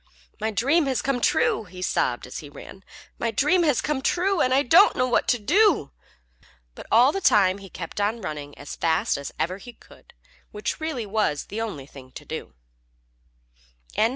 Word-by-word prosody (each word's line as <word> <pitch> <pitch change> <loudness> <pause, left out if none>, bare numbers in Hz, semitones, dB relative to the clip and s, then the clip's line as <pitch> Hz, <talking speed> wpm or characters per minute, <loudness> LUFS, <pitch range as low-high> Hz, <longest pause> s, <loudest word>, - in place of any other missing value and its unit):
"My 220 +1 -1
dream 275 - +2
has 260 -2 -1
come 270 -3 -1
true!" 220 - +2
he 180 0 -9
sobbed 120 -8 0
as 125 - -7
he 145 - -10
ran. 190 +6 -12 0.4
"My 230 - 0
dream 295 - +2
has 295 -7 +2
come 295 -2 -2
true, 365 +5 +1
and 255 - +2
I 270 +2 +3
don't 345 - +6
know 255 - +1
what 245 - +1
to 245 - +3
do!" 330 - +2 0.8
But - - -11
all 245 +5 +6
the 390 - -3
time 195 - +4
he 195 -1 -12
kept 175 +3 -6
on 215 +3 0
running 150 -7 -7
as - - -8
fast 160 -1 +1
as 140 -1 -6
ever 185 +4 -2
he 245 +3 -11
could, - - -20 0.3
which 210 +8 -4
really 315 -8 -3
was 200 -8 -1
the 220 +2 -4
only 180 -12 -5
thing 130 -2 -14
to - - -10
do. - - -7
220 Hz, 185 wpm, -24 LUFS, 180-275 Hz, 0.8 s, don't